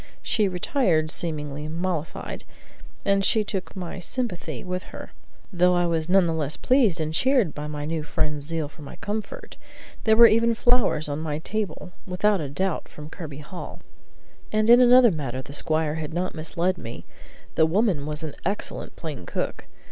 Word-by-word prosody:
She 215 -3 +2
retired 180 - +1
seemingly 150 -3 -3
mollified, 165 -1 -3 0.6
and 200 0 +3
she 215 +3 +3
took 195 -2 -5
my 185 0 -5
sympathy 225 0 -4
with 180 0 -4
her, - - -10 0.4
though 180 0 +4
I 175 0 +2
was 165 -1 -1
none 190 0 +5
the 165 - 0
less 155 -2 0
pleased 240 -10 +3
and 155 0 -2
cheered 250 - +3
by 150 0 -5
my 150 -1 -4
new 160 +1 -2
friend's 150 0 -2
zeal 165 -2 -1
for 150 +2 -16
my 145 - -9
comfort; 220 - -5 0.5
there 220 -1 +5
were 235 - +10
even 230 +1 +4
flowers 240 -11 +2
on 145 0 -3
my 155 -2 -2
table, 195 +1 -4 0.2
without 190 +1 +2
a 145 - -4
doubt 185 +4 -2
from 150 +1 -10
Kirby 150 -5 -7
Hall. 175 +3 -8 0.7
And 215 +1 +3
in 240 - +9
another 245 -1 +7
matter 130 -5 -4
the 140 - -10
squire 155 0 +1
had 160 0 -5
not 180 +1 -1
misled 170 +3 -1
me: 115 -5 -8 0.5
the 160 - +4
woman 180 -5 +1
was 150 +1 -4
an 155 - -4
excellent 200 +3 -3
plain 150 - -7
cook. - - -3
170 Hz, 175 wpm, -25 LUFS, 155-205 Hz, 0.7 s, were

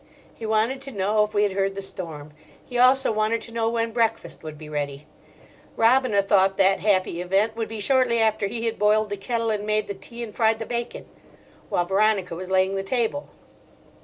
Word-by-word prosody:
He 225 - -7
wanted 220 +5 +1
to 275 - -8
know 210 0 +1
if 210 0 -5
we 205 - +3
had 205 - +1
heard 195 0 0
the 195 - -4
storm. 155 -6 -7 0.3
He 245 -1 -4
also 255 +1 +5
wanted 215 +1 0
to 230 - -8
know 225 -1 0
when 230 0 -1
breakfast 225 -1 -1
would 155 -1 -8
be 155 0 -10
ready. 145 -1 -4 0.7
Robina 230 -3 +3
thought 195 -1 +3
that 195 0 +4
happy 185 -4 +1
event 195 +5 +1
would 225 -1 -3
be 220 -1 -7
shortly 250 +1 +2
after 220 -2 +1
he 230 +3 -4
had 225 0 -2
boiled 210 0 +2
the - - -1
kettle 230 +3 -1
and 210 -1 -2
made 215 0 0
the 200 - -5
tea 235 +5 -9
and 215 -3 -8
fried 225 -1 +2
the 225 - -5
bacon, 235 0 -4 0.6
while 175 - +1
Veronica 195 -1 +1
was 185 +2 -6
laying 190 0 +2
the 195 - -1
table. 240 +7 -2
215 Hz, 205 wpm, -24 LUFS, 195-230 Hz, 0.7 s, also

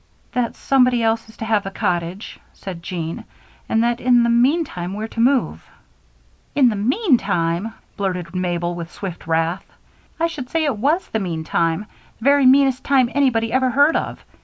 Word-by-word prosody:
"That 245 -2 -1
somebody 250 -3 +2
else 225 0 0
is 220 - -17
to 225 - -5
have 220 -2 +1
the 195 - -4
cottage," 175 +1 -3
said 185 -4 -8
Jean, 170 -2 -5 0.5
"and 225 0 +2
that 240 0 0
in 245 -1 +4
the 235 - +2
meantime 235 - +1
we're 215 +1 -4
to 230 - -8
move." 235 - +1 0.9
"In 270 -4 +5
the 220 - -2
meantime!" 220 - 0 0.2
blurted 180 -4 -3
Mabel, 175 -1 -1
with 170 -1 -7
swift 180 -4 -7
wrath. 165 +3 -1 0.5
"I 330 - +2
should 300 -7 -5
say 325 -1 0
it 285 -6 0
was 300 - +1
the 220 - -1
meantime 165 0 -1 0.3
the - - -13
very 280 0 +5
meanest 265 -1 +4
time 260 -4 +2
anybody 230 -5 +1
ever 260 0 +2
heard 285 +5 +4
of. - - -2
225 Hz, 170 wpm, -20 LUFS, 180-260 Hz, 0.9 s, In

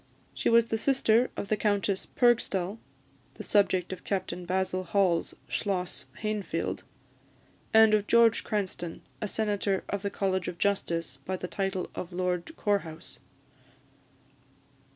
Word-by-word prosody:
She - - 0
was 230 0 +5
the 225 - 0
sister 250 -2 +3
of 200 - -4
the 215 - +3
Countess 205 -2 0
Purgstall 220 -5 +1 0.6
(the - - -8
subject 190 -3 +2
of 185 - -9
Captain 180 -3 -3
Basil 185 0 0
Hall's 185 -4 +1
"Schloss 185 -4 -2 0.2
Hainfeld"), 215 -2 -2 0.9
and 220 -1 +7
of 210 -1 +2
George 235 -1 +5
Cranstoun, 190 -6 -3 0.2
a 210 - -1
senator 205 -2 0
of 200 - -2
the 200 - -1
College 190 -2 -1
of 175 - -4
Justice, 170 -8 -1
by 185 +4 -3
the 180 - -5
title 195 -1 -2
of 180 - -6
Lord 180 - -2
Corehouse. 185 -7 -2
195 Hz, 130 wpm, -29 LUFS, 180-215 Hz, 0.9 s, and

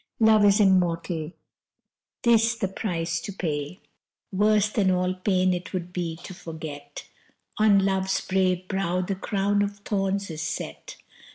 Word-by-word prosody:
Love 220 -2 +5
is 200 +1 +5
immortal: 175 -4 +2 0.9
this 230 0 +4
the 200 - -1
price 170 -4 -2
to - - -6
pay. 155 -1 -4 0.5
Worse 210 +1 +3
than 210 -3 +1
all 180 0 +1
pain 185 0 +1
it 180 +2 -5
would 180 -1 -4
be 170 -3 -3
to 190 - -8
forget 155 -4 -8 0.5
On 200 -2 +5
Love's 190 -1 +1
brave 185 -1 0
brow 185 -2 -1
the 185 +2 -2
crown 200 +1 0
of 205 0 -2
thorns 195 -2 -1
is 155 -1 -5
set. 160 - -5
190 Hz, 145 wpm, -25 LUFS, 175-200 Hz, 0.9 s, Love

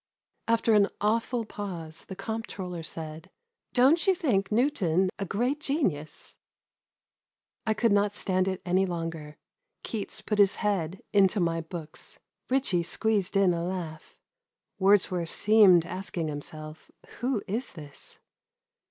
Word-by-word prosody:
After 230 0 +3
an 205 -1 +5
awful 230 +2 0
pause 175 -7 -6
the 190 - -8
comptroller 195 -4 -5
said, 160 0 -7 0.4
"Don't 285 +7 +4
you 380 - +5
think 225 - 0
Newton 195 - +2
a 200 - -1
great 245 - 0
genius?" 260 - -2 1.3
I 220 - +2
could 230 +1 +2
not 205 0 +2
stand 185 0 +1
it 190 -1 -3
any 185 +2 +2
longer. 165 -3 -5 0.5
Keats 215 0 -4
put 210 -1 -1
his 200 -1 +5
head 195 -4 -1
into 200 0 +4
my 165 -2 +1
books. 160 -1 -8 0.3
Ritchie 255 -9 +2
squeezed 200 +2 0
in 190 -3 +4
a 170 0 -2
laugh. 170 -4 -5 0.6
Wordsworth 190 -3 +3
seemed 200 -6 +6
asking 175 -3 -3
himself, 155 +1 -8
'* - - -22
Who 245 -3 0
is 230 +7 -3
this 145 -4 -7
195 Hz, 130 wpm, -28 LUFS, 170-220 Hz, 1.3 s, seemed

